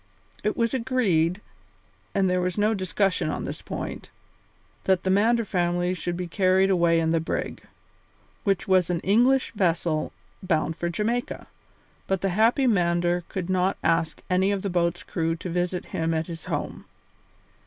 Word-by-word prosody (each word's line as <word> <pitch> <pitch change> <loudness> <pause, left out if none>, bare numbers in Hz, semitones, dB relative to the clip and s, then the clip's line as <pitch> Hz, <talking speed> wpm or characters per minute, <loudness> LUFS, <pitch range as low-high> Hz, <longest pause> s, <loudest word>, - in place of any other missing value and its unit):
It 210 - 0
was 230 -1 +1
agreed, 210 -9 +1 0.7
and 195 -1 +3
there 180 0 +1
was 180 +1 -2
no 210 +2 +3
discussion 195 -1 0
on - - -3
this - - -6
point, - - -6 0.8
that 190 -1 +2
the 190 - +1
Mander 225 +4 +3
family 175 -1 0
should 175 -1 -3
be 180 - -3
carried 190 +1 +3
away 170 -2 +3
in 160 0 +1
the 165 - +2
brig, 160 - -3 0.8
which 195 -2 0
was 185 -2 +3
an 175 -2 0
English 245 +7 +3
vessel 170 -5 0 0.3
bound 165 -3 0
for 170 +1 -2
Jamaica, 225 +7 -2 0.6
but 190 -2 0
the 195 - +1
happy 225 +8 +3
Mander 175 -5 +2
would 185 -3 -2
not 185 +1 +1
ask 165 -1 0
any 185 +2 +2
of 200 -2 -2
the 200 - -2
boat's 175 0 0
crew 165 -1 -1
to 180 - -6
visit 180 +1 -1
him 165 0 0
at 160 0 -1
his 165 -1 -8
home. - - -4
180 Hz, 165 wpm, -25 LUFS, 170-200 Hz, 0.8 s, and